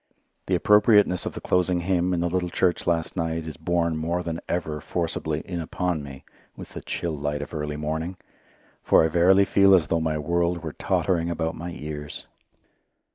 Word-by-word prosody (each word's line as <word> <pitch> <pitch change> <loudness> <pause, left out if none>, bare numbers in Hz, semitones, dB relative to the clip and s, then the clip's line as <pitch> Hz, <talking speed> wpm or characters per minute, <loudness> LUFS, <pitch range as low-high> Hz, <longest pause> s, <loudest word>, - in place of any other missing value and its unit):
The 95 - +2
appropriateness 105 -1 +4
of - - -4
the - - -7
closing 90 -1 +1
hymn 90 0 +1
in 90 -2 0
the 85 - +1
little 90 0 -1
church 90 0 0
last 85 -2 0
night 80 -2 -2
is 80 -2 -6
borne 85 +2 0
more 85 +3 -1
than 85 -1 -4
ever 80 -4 -2
forcibly 80 -2 -2
in 90 -1 -5
upon 85 0 -2
me 70 -1 -10 0.3
with - - -9
the - - -8
chill 85 -2 -3
light 75 0 -3
of 75 - -11
early 75 -1 -3
morning, 80 +4 -3 0.6
for - - +4
I 80 - +2
verily 90 +4 +5
feel 100 0 +5
as 80 -5 +1
though 85 -1 +1
my 80 -1 0
world 85 +3 0
were 80 -2 -5
tottering 85 -2 0
about 80 -1 -2
my 85 +2 -6
ears. 75 -2 -7
85 Hz, 185 wpm, -25 LUFS, 80-90 Hz, 0.6 s, verily